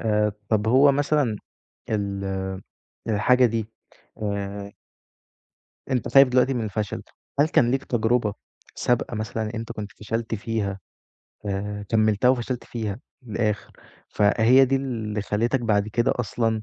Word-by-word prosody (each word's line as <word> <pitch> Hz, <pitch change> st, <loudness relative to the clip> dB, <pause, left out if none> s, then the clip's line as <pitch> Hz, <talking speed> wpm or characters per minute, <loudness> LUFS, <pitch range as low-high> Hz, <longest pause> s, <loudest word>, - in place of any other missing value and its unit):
آآ 105 Hz, -2 st, +1 dB, 0.2 s
طَب 110 Hz, 0 st, +2 dB
هو 140 Hz, +3 st, +6 dB
مثلًا 145 Hz, -5 st, +1 dB, 0.5 s
ال 100 Hz, -2 st, -2 dB, 0.8 s
الحاجة 125 Hz, +4 st, +4 dB
دي 115 Hz, -2 st, -2 dB, 0.6 s
آآ 100 Hz, 0 st, -3 dB, 1.2 s
أنت 125 Hz, -, 0 dB
خايف 135 Hz, 0 st, +7 dB
دلوقتي 125 Hz, +1 st, +3 dB
من 120 Hz, -, -1 dB
الفشل، 105 Hz, -1 st, -3 dB, 0.4 s
هل 150 Hz, -, +5 dB
كان 120 Hz, -5 st, +3 dB
ليك 135 Hz, +1 st, 0 dB
تجربة 115 Hz, -2 st, +1 dB, 0.4 s
سابقة 120 Hz, -1 st, 0 dB
مثلًا 110 Hz, +1 st, -3 dB
أنت 115 Hz, 0 st, -5 dB
كنت 105 Hz, -1 st, -6 dB
فشلت 115 Hz, +1 st, -3 dB
فيها 100 Hz, -3 st, -3 dB, 0.7 s
آآ 105 Hz, +1 st, -3 dB
كمِّلتها 110 Hz, +1 st, +3 dB
وفشلت 125 Hz, -1 st, 0 dB
فيها 110 Hz, -2 st, -4 dB, 0.2 s
للآخِر، 110 Hz, -2 st, -2 dB, 0.4 s
فهي 115 Hz, +5 st, +5 dB
دي 135 Hz, +1 st, +1 dB
اللي 110 Hz, -6 st, -3 dB
خلّتك 115 Hz, +5 st, 0 dB
بعد 105 Hz, -2 st, +1 dB
كده 120 Hz, +2 st, +1 dB
أصلًا 115 Hz, -1 st, -1 dB
110 Hz, 125 wpm, -24 LUFS, 105-125 Hz, 1.2 s, خايف